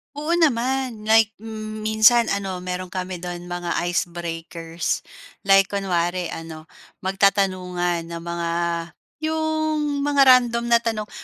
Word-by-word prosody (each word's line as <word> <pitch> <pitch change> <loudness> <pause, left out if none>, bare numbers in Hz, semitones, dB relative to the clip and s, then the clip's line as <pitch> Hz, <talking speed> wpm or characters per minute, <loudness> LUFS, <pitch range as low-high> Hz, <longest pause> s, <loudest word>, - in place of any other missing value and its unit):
Oo, 300 +3 -3
naman 255 -5 0
like 220 0 +4 0.5
minsan 220 +2 +4
ano, 195 -2 -3
meron 185 0 -4
kami 185 0 -5
dun 175 0 -7
mga 175 -1 -3 0.2
icebreakers, 170 -1 -3 0.4
like 195 0 +5
kunwari 180 -3 -1
ano, 160 -1 -8 0.4
magtatanungan 185 -3 +1
ng 170 0 -6
mga 170 0 -3 0.7
yung 310 -2 -1
mga 285 -1 +3 0.2
random 235 -1 -2
na 235 - +6
tanong. 225 -2 -3
195 Hz, 110 wpm, -22 LUFS, 175-235 Hz, 0.7 s, na